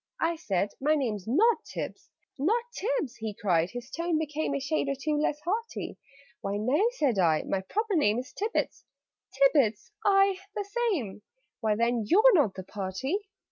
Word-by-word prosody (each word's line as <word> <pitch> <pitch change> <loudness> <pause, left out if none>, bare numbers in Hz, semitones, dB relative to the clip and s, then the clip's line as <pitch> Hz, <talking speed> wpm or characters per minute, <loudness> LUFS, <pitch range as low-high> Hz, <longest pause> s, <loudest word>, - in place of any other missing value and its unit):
I 335 +1 +1
said 200 - -1
"My 305 +3 +3
name's 220 -9 -2
not 430 - +3
Tibbs." - - -6 0.3
"Not 435 - +2
Tibbs!" 425 - -2
he 220 -2 -5
cried 175 -4 +1
his 245 +2 -8
tone 335 -1 0
became 305 -1 -2
A - - 0
shade 280 +1 -1
or 275 - 0
two 300 +2 0
less 295 0 0
hearty 435 +8 -3 0.4
"Why, 200 +1 -2
no," 285 - +2
said 270 - +1
I. 160 -4 +3
"My 190 - -1
proper 420 - -1
name 220 -9 +3
Is 255 +2 -5
Tibbets 430 +3 -2 0.3
" - - -42
"Tibbets?" 230 - +3
"Aye, 390 -1 +4 0.2
the 410 - -2 0.2
same." 225 - -2 0.4
"Why, 220 -3 +1
then 235 +1 +1
YOU'RE 440 - +6
NOT 280 - +3
THE 190 - -6
PARTY!" 210 - -3
280 Hz, 175 wpm, -28 LUFS, -, 0.4 s, YOU'RE